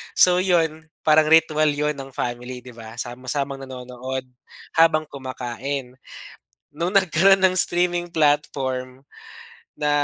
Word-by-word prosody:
So, 180 0 +5
yun, 165 -4 +1 0.2
parang 155 0 +5
ritwal 155 -1 +4
yun 150 +1 -1
ng 135 0 -8
family, 125 +1 -4
'di 125 - -11
ba, 115 0 -10
sama-samang 130 +3 -4
nanonood 130 0 -6 0.5
habang 160 -1 +4
kumakain. 130 0 -5 0.8
Nung 170 +4 -1
nagkaroon 195 +1 +5
ng 185 -1 +4
streaming 175 0 +1
platform, 135 -4 0 0.7
na 150 -1 -2
145 Hz, 115 wpm, -22 LUFS, 130-160 Hz, 0.8 s, So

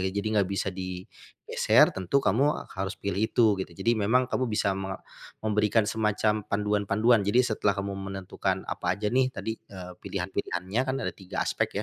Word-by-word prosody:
Jadi 100 +2 -3
enggak 100 -3 +2
bisa 100 0 -1
digeser, 90 -1 +1
tentu 95 +6 -1
kamu 135 +9 +2
harus 95 0 -3
pilih 100 -1 -2
itu, 115 -3 +4
gitu. - - -3
Jadi 105 +5 +2
memang 115 +4 +3
kamu 130 0 -1
bisa 100 -2 +1
me 95 0 -4 0.5
memberikan 105 0 +2
semacam 105 -1 0
panduan-panduan. 105 +2 +2
Jadi 105 +6 +3
setelah 105 -3 +1
kamu 100 0 -3 0.2
menentukan 95 0 -3
apa 90 0 -2
aja 105 +2 -2
nih 130 0 +3
tadi, 110 -3 -4 0.2
eee, 90 -2 -9
pilihan-pilihanannya 95 +2 -2
kan 130 - +1
ada - - -2
3 95 -2 -4
aspek - - 0
100 Hz, 160 wpm, -27 LUFS, 95-110 Hz, 0.5 s, itu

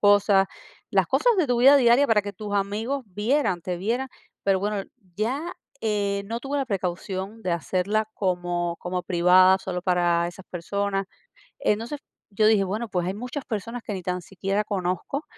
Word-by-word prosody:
cosas. 205 -1 +5 0.4
Las - - +3
cosas 485 -3 +3
de 350 -6 +3
tu 245 - +2
vida 275 +4 +8
diaria, 250 +2 +5
para 215 -2 +3
que 205 0 -5
tus 205 +1 -5
amigos 215 +7 -1
vieran 210 -1 0
te 180 -1 -3
vieran. 235 +8 -1 0.4
Pero 195 -1 +2
bueno, 205 -1 -1 0.3
ya 240 +7 0 0.4
eh, 200 -2 0
no 230 +2 -3
tuve 275 +3 -3
la 270 - -1
precaución, 190 +2 -3
de 185 - -1
hacerla 185 +7 0
como 175 -2 -1
como 180 0 -3
privada, 185 +1 +5
solo 185 -2 -4
para 175 -2 +2
esas 185 +2 -12
personas. 195 +3 -2 0.6
Entonces, 230 +7 -1 0.3
yo 215 +2 +2
dije: 210 -3 +4
"Bueno, 215 +5 -3
pues, 180 -3 -1
hay 185 - -2
muchas 250 +6 -5
personas, 230 +2 -4
que 210 - -4
ni 185 - -5
tan 180 0 -2
siquiera 195 +3 -2
conozco, 190 - -2
200 Hz, 170 wpm, -25 LUFS, 185-225 Hz, 0.6 s, vida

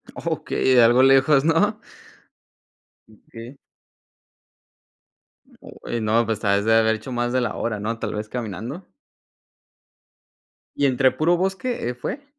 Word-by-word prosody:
Okey, 130 -1 0
algo 120 +2 +5
lejos, 135 +1 +4
¿no? 205 +7 +1 1.3
Okey. 115 +4 -13 2.0
Oye, 120 - -7
no, 110 +2 +1
pues, 110 -2 -3
te 105 - -4
has 100 +1 +1
de 110 - +3
haber 110 0 +3
hecho 110 +4 -9
más 120 0 -2
de 130 - +1
la 120 - -3
hora, 110 -3 -3
¿no?, 115 +2 -4
tal 110 - -4
vez 105 0 -5
caminando. 120 - -6 1.9
¿Y 145 - 0
entre 130 0 +2
puro 170 +3 +1
bosque, 190 - -2
eh, 125 - -3
fue? 270 - -6
120 Hz, 130 wpm, -22 LUFS, 110-145 Hz, 2.0 s, algo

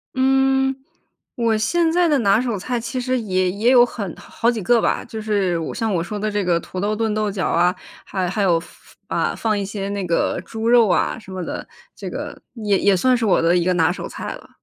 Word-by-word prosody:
嗯， 265 0 +2 0.6
我 230 -2 +1
现 330 +9 +1
在 350 0 +3
的 295 -3 +3
拿 205 +1 +3
手 235 -5 -2
菜 245 +5 -2
其 250 +2 -4
实 255 0 0
也 185 -4 0
也 215 +5 +1
有 245 -1 +7
很 200 -7 -6
好 235 +1 -2
几 230 -3 -1
个 235 +3 +3
吧， - - 0
就 220 -1 -7
是 200 -5 0
我 160 - -4
像 225 -4 -1
我 170 -2 0
说 210 +4 -5
的 215 +1 -2
这 205 -1 0
个 175 -2 +2
土 185 - -7
豆 210 +2 0
炖 220 -1 -1
豆 215 -1 0
角 190 -2 -2
啊， 180 +2 +2 0.3
还 185 -2 -2
还 200 +3 -2
有 175 -4 +3
放 - - -14 0.4
啊， - - -1
放 215 -2 0
一 200 - -1
些 195 0 -4
那 200 -1 -3
个 170 0 0
猪 225 0 -4
肉 235 -2 +6
啊 - - +1
什 190 -3 -13
么 185 -1 -4
的， - - -6 0.3
这 - - -6
个 - - -6
也 210 -3 +1
也 200 -2 +3
算 255 +6 +3
是 235 - -2
我 190 - +3
的 170 +2 +3
一 175 - +2
个 185 +1 +2
拿 165 0 +3
手 - - -5
菜 - - -6
了。 - - -13
210 Hz, 260 characters per minute, -21 LUFS, 185-240 Hz, 0.6 s, 有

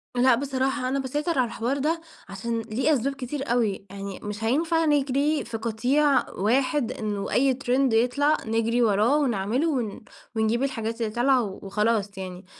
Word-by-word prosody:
لأ، 250 0 +5
بصراحة 265 -1 -1
أنا 275 +1 0
باسيطر 295 +4 -1
على 250 - +3
الحوار 235 +4 -2
ده 320 +4 0 0.3
عشان 230 +4 -3
ليه 240 +8 0
أسباب 275 +1 0
كتير 270 -1 -4
أوي، 210 -5 0
يعني 195 0 -7
مش 210 +1 -5
هينفع 325 +7 +1
نجري 290 +1 +1
في 230 -1 -4
قطيع 250 +5 +1
واحد، 255 - +1
إنه 205 -2 -3
أي 265 +1 +3
ترند 260 -1 +1
يطلَع 280 +7 +3
نجري 230 +2 +1
وراه 220 +5 +3
ونعمله 250 +2 0
ون 240 -9 -2 0.3
ونجيب 220 +3 +1
الحاجات 230 -3 -3
اللي 220 -2 -1
طالعة 250 +1 +3
و 195 -3 -6
وخلاص 210 0 0
يعني، 185 0 -7
245 Hz, 160 wpm, -25 LUFS, 220-275 Hz, 0.3 s, لأ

